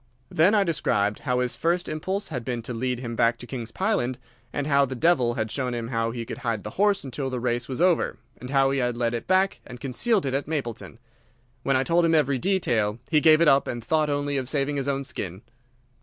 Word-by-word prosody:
Then 180 +7 +4
I 205 - +4
described 105 - 0
how 125 -2 0
his 125 -1 -1
first 175 +2 0
impulse 190 +6 -3
had 125 -7 -4
been 120 -1 -3
to 125 - -5
lead 125 +1 -2
him 115 -2 -5
back 115 0 +2
to 120 - -10
King's 120 -2 -6
Pyland, 185 - 0 0.3
and 145 - -2
how 140 -1 +4
the 130 -1 -2
devil 125 -4 +2
had 110 -3 -2
shown 125 -3 -2
him 115 -1 -4
how 115 -2 0
he 115 0 -5
could - - -7
hide 115 -5 -2
the - - -6
horse 205 -1 +2
until 135 0 -4
the 130 -1 -3
race 120 0 -1
was 130 - -4
over, 180 -1 +2 0.2
and 125 - -8
how 135 -1 +3
he 135 - 0
had 125 -1 -1
led 120 -1 0
it 120 - -4
back 190 +1 +2
and 125 0 -10
concealed 175 - 0
it 135 - -1
at 140 +1 -1
Mapleton. 120 -8 -4 0.6
When 135 +2 +1
I 130 - +1
told 170 +4 +2
him 165 -1 +3
every 140 -4 +2
detail 120 - +1
he 155 -2 +4
gave 155 0 +6
it 170 - +5
up 140 -1 +4
and 120 -2 -4
thought 155 +3 +1
only 145 0 -1
of 130 -1 -3
saving 145 0 0
his 140 0 -2
own 140 0 -1
skin." 95 -7 -6
135 Hz, 240 wpm, -25 LUFS, 120-155 Hz, 0.6 s, gave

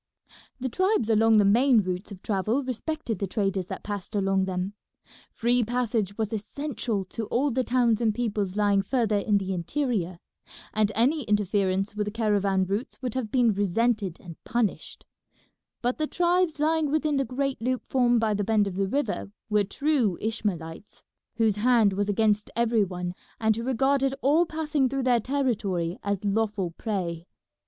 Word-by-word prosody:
The 260 - -2
tribes 315 - +1
along 220 0 +5
the 205 - +5
main 235 +3 +5
routes 185 +2 -4
of 190 -2 -10
travel 215 +6 0
respected 255 - -3
the 195 - -1
traders 195 -2 -1
that - - -6
passed 205 0 -5
along 195 -1 +2
them; 185 +1 -3 0.6
free 245 +1 +1
passage 225 -4 -1
was 220 -1 -2
essential 225 -2 -3
to 220 +3 -5
all 270 +6 +1
the 255 +2 0
towns 240 -3 +2
and 225 -2 +3
peoples 210 -4 -2
lying 205 -1 +3
further 220 -1 +1
in 205 0 +2
the 190 -1 -2
interior, 185 - -2 0.6
and 215 -1 +2
any 270 +8 +2
interference 200 -2 +1
with 210 0 -1
the 210 - -3
caravan 200 -4 +1
routes 200 +7 -4
would 250 -3 -2
have 255 -4 -3
been 240 -2 +3
resented 205 -1 0
and 170 -3 -12
punished; 235 -4 -2 0.8
but 245 +4 0
the 310 - 0
tribes 350 -2 +1
lying 310 0 +2
within 305 -1 +1
the 275 - +2
great 270 0 -2
loop 255 +1 -1
formed 245 -2 +3
by 220 -1 +1
the 205 0 -1
bend 215 0 +2
of 190 -2 -5
the 195 0 +1
river 220 -4 -2 0.2
were 210 -1 +4
true 245 - 0
Ishmaelites, 200 -5 -4 0.3
whose 220 -3 +2
hand 225 -2 +4
was 205 +1 -1
against 210 0 +1
every 230 -2 +2
one, 180 -2 -4 0.3
and 220 -1 +2
who 230 - -3
regarded 270 +2 +1
all 310 +6 +4
passing 305 -4 0
through 270 0 -2
their 250 -2 +3
territory 210 -10 -1
as 200 0 -2
lawful 205 -3 0
prey. 175 -4 -4
220 Hz, 170 wpm, -26 LUFS, 200-255 Hz, 0.8 s, along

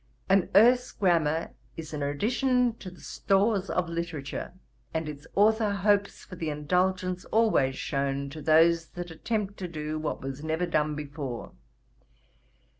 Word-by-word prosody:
An 195 -1 +3
Erse 245 +4 +5
Grammar 165 -4 +1 0.3
is 160 -1 -7
an 150 - -3
addition 245 - +1
to 185 - -7
the 180 - -15
stores 200 0 +1
of 180 -2 0
literature; 165 -4 -4 0.4
and 160 -1 -1
its 145 -1 -8
authour 220 +1 +4
hopes 200 0 +1
for 185 - -10
the 165 -2 -3
indulgence 180 +4 0
always 210 -13 +2
shewn 140 0 -2
to 155 - -8
those 165 +2 +4
that 175 -1 -6
attempt 205 +4 -3
to 185 - -4
do 155 -2 -4
what 155 - -3
was 135 +2 -5
never 160 +2 0
done 155 -3 0
before. 145 -4 -6
170 Hz, 145 wpm, -28 LUFS, 150-200 Hz, 0.4 s, Erse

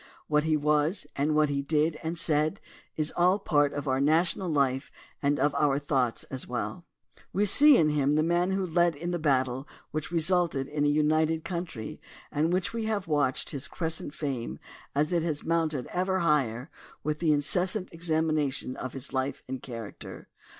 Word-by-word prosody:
What 150 0 +2
he 155 -1 +2
was, 150 +4 +1
and 150 +2 +1
what 155 -1 +3
he 140 -1 0
did 155 +2 0
and 165 +1 -3
said, 155 +3 +1 0.4
is 155 -1 +1
all 180 +3 +4
part 145 -7 +2
of 145 0 -5
our 130 0 +1
national 170 +5 +2
life 135 -3 0 0.3
and 145 0 +1
of 145 +1 +2
our 140 -2 +2
thoughts 135 -5 0
as 130 -1 -7
well. 145 +8 -4 0.5
We 205 +2 +1
see 285 +7 +7
in 155 - +4
him 145 -1 +2
the 155 +1 +3
man 175 +2 +1
who 190 0 0
led 175 -1 +2
in 170 +4 -4
the 175 - -1
battle 130 -3 0 0.2
which 155 +1 -4
resulted 170 -5 +1
in 145 0 -1
a - - +4
united 155 +2 +2
country 170 - -5 0.3
and 155 +3 +1
we 205 +5 -1
have 210 -4 -2
watched 145 -4 0
his 140 -1 -4
crescent 160 -3 -3
fame 135 -6 -3 0.4
as 150 +4 +1
it 170 - +2
has 155 -3 -2
mounted 160 -5 0
ever 185 +1 0
higher 140 -4 +1 0.3
with 150 0 -2
the 165 -2 +2
incessant 180 +7 +1
examination 155 -5 0
of 130 - -5
his 135 +1 -6
life 130 +1 -2
and 130 -1 -5
character. 115 -4 -9
155 Hz, 180 wpm, -28 LUFS, 140-170 Hz, 0.5 s, see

